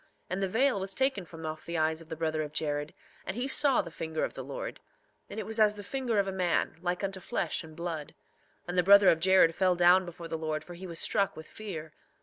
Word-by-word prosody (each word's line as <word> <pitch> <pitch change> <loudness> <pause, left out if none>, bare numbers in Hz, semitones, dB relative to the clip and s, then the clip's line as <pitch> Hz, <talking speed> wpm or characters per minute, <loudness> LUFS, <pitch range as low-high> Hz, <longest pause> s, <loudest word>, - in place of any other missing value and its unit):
And 185 +2 -1
the 195 - +1
veil 240 +3 +2
was 190 0 -2
taken 265 -8 0
from 160 -1 -9
off 155 0 -5
the 170 0 -4
eyes 160 +1 +1
of 160 - -15
the 160 - -4
brother 155 -1 -1
of 150 -1 -5
Jared, 145 -1 -2 0.3
and 190 +4 -5
he 250 +2 -1
saw 275 -1 +4
the 170 - -9
finger 160 0 -3
of - - -2
the - - -6
Lord; - - -6 0.5
and - - -6
it - - -4
was 220 0 -2
as 210 -1 +5
the 205 - -8
finger 250 0 -1
of 200 -1 +2
a - - -1
man, 180 -4 0
like 180 +1 -2
unto 195 -1 -2
flesh 180 - -2
and 160 -1 -12
blood; 165 -3 -5 0.5
and 175 - -3
the - - +7
brother 200 +1 +7
of 165 - +3
Jared 185 -2 +5
fell 185 +1 +2
down 175 +2 +6
before 170 -1 -8
the 160 -1 -4
Lord, 155 -1 -2
for 175 - -10
he 185 +2 -8
was 170 -2 -6
struck 200 0 +1
with 160 - -8
fear. 160 -8 -7
175 Hz, 255 wpm, -30 LUFS, 160-200 Hz, 0.5 s, the